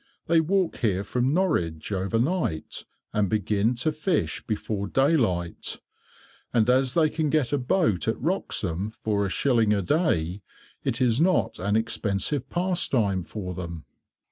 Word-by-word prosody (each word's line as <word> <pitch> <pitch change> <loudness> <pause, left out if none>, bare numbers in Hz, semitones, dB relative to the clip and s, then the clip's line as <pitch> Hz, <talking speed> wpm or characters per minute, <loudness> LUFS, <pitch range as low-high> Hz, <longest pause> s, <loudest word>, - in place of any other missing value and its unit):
They 165 -1 +4
walk 185 +2 0
here 100 -5 0
from 125 +5 0
Norwich, 90 - 0
overnight, 115 - -1 0.3
and 105 -3 +1
begin 105 +2 +1
to 155 +7 0
fish 155 +3 -1
before 105 -2 -2
daylight, 115 - 0 0.7
and 115 -3 +2
as 130 0 +2
they 160 -2 +5
can 155 0 -1
get 145 -3 +1
a 145 - +2
boat 125 - +1
at 110 - 0
Wroxham 105 - -1
for 100 -2 -1
a - - -4
shilling 115 -1 +2
a 100 - -1
day, 100 - 0 0.4
it 120 - -1
is 125 +2 +3
not 180 +1 +2
an 100 +3 0
expensive 110 +4 -1
pastime 135 - +1
for 90 +1 -6
them." 85 -3 -7
115 Hz, 145 wpm, -26 LUFS, 100-155 Hz, 0.7 s, they